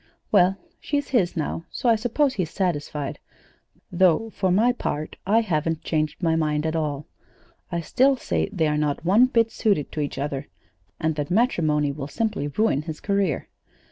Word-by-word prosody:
"Well, 185 +2 +4 0.2
she's 285 -1 -2
his 195 -10 +1
now, 165 +1 -3
so 255 - -3
I 230 - +6
suppose 250 +5 +1
he's 180 -8 -2
satisfied; 150 -6 -2 0.7
though, 185 +4 +3
for 190 -3 0
my 215 +7 +4
part, 155 -10 -4
I 220 +3 +4
haven't 165 -5 -1
changed 155 +1 -1
my 165 -1 +3
mind 150 -1 0
at 160 0 -1
all. 150 -2 -2 0.7
I 170 - -1
still 265 - +3
say - - -1
that 205 - -11
they 160 - +3
are 150 0 0
not 150 +1 -1
one 215 +8 +5
bit 230 -3 +2
suited 195 -10 0
to - - -5
each 145 - -3
other, 140 -1 -3 0.5
and 160 0 0
that 145 +1 -2
matrimony 160 - +2
will 140 -1 -6
simply 215 -6 -2
ruin 145 -1 +1
his 155 0 -7
career. 200 -6 0
170 Hz, 175 wpm, -24 LUFS, 150-220 Hz, 0.7 s, I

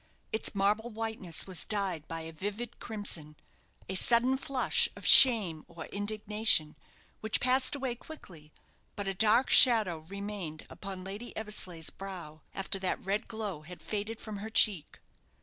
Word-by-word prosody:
Its 220 -1 -2
marble 210 +4 0
whiteness 220 -6 -4
was 185 -3 0
dyed 190 -7 -1
by 165 0 -6
a 160 0 -8
vivid 205 +8 -7
crimson 175 -9 -5 0.5
a 190 - -4
sudden 240 +6 +3
flush 275 - +1
of - - -12
shame 210 - +8
or 170 -2 -10
indignation, 210 -5 +1 0.4
which 220 0 -1
passed 255 +2 +2
away 265 -3 -4
quickly; 180 - -14 0.4
but 205 -2 -6
a 195 - -2
dark 225 +6 +2
shadow 215 -9 +6
remained 190 -2 -8
upon 190 -2 -8
Lady 205 +6 -9
Eversleigh's 185 -7 -5
brow 175 -6 -10
after 195 0 -2
that 185 -1 -4
red 200 +2 -3
glow 210 -8 -6
had 175 +3 -13
faded 215 +1 -6
from 215 -2 -8
her 210 +2 -8
cheek. 205 -7 +2
205 Hz, 150 wpm, -29 LUFS, 180-220 Hz, 0.5 s, shame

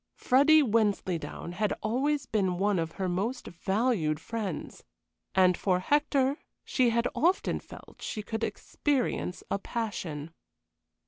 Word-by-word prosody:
Freddy 290 +4 +5
Wensleydown 205 - 0
had 200 +3 0
always 270 +6 0
been 190 -7 0
one 200 0 +2
of 165 0 -2
her 190 - -2
most 205 +8 -2
valued 190 -4 0
friends, 205 -3 -5 0.5
and 185 -1 +5
for 185 0 +1
Hector 285 - +2 0.3
she 255 -3 +2
had 235 +1 +1
often 360 +5 +1
felt - - -14
she 215 - -4
could 220 +1 -4
experience 260 -10 -1
a 200 - +1
passion. 170 -10 -4
215 Hz, 125 wpm, -29 LUFS, 185-255 Hz, 0.5 s, Freddy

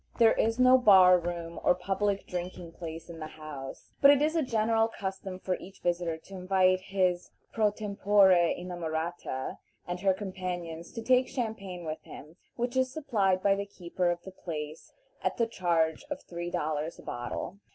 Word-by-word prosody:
There 230 -2 +6
is 225 +1 +1
no 255 0 +6
bar 185 -5 +7
room 170 -1 -5
or - - +4
public 195 +2 -1
drinking 180 -1 -5
place 165 -1 -8
in 170 -2 -9
the 155 - -5
house, 150 -4 -9
but 280 - +9
it 285 -1 +7
is 305 +3 +1
a 325 - +3
general 225 -3 +2
custom 190 -3 -5
for 185 0 -2
each 190 +1 -13
visitor 175 -2 0
to 175 +4 -16
invite 185 0 +3
his 185 -2 0 0.2
pro 215 -2 +3
tempore 205 -1 +3 0.3
inamorata 170 -5 -4 0.3
and 175 0 -4
her 190 0 +2
companions 180 -4 -5
to 230 - -5
take 255 +1 +4
champagne 200 -8 -4
with 155 0 -4
him, 155 +4 -12 0.2
which 245 +1 -2
is 260 0 +2
supplied 205 -11 +1
by 200 - +5
the 200 0 -3
keeper 180 -2 -2
of 175 0 -2
the 190 - -9
place 155 -4 -7 0.3
at - - 0
the 230 - +3
charge 170 - 0
of 290 -1 -5
three 175 0 -5
dollars 155 0 -2
a - - -13
bottle. 120 +10 -5
185 Hz, 175 wpm, -29 LUFS, 170-210 Hz, 0.3 s, but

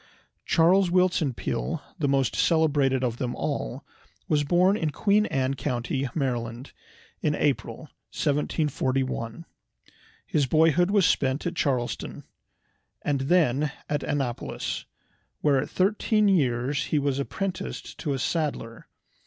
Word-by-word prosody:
Charles 175 +3 +4
Willson 175 -7 +2
Peale, 165 +6 -2 0.2
the 145 - +1
most 135 -7 +1
celebrated 145 -3 +2
of 120 -2 -1
them 125 -1 -3
all, - - -3 0.4
was 150 -1 +2
born 180 +6 +3
in 160 -7 -1
Queen 205 +7 +2
Anne 135 -2 0
County, 130 +1 -2
Maryland, 120 -3 -3 0.5
in 150 -1 +1
April, 135 -5 -1 0.3
1741. 135 -3 -1 0.8
His 145 -3 +1
boyhood 160 +5 +4
was 200 -3 +4
spent 135 -1 +1
at 175 - -1
Chestertown, 130 -7 -2 0.8
and 140 -2 0
then 150 -2 +2 0.2
at 145 -1 -1
Annapolis, 135 -5 -3 0.6
where 140 -3 +3
at - - -5
thirteen 210 +2 +2
years 140 -6 +1
he 155 - 0
was 140 -1 0
apprenticed 190 +6 -4
to 145 -5 -1
a - - -1
saddler. 135 -6 -3
145 Hz, 120 wpm, -26 LUFS, 130-165 Hz, 0.8 s, Charles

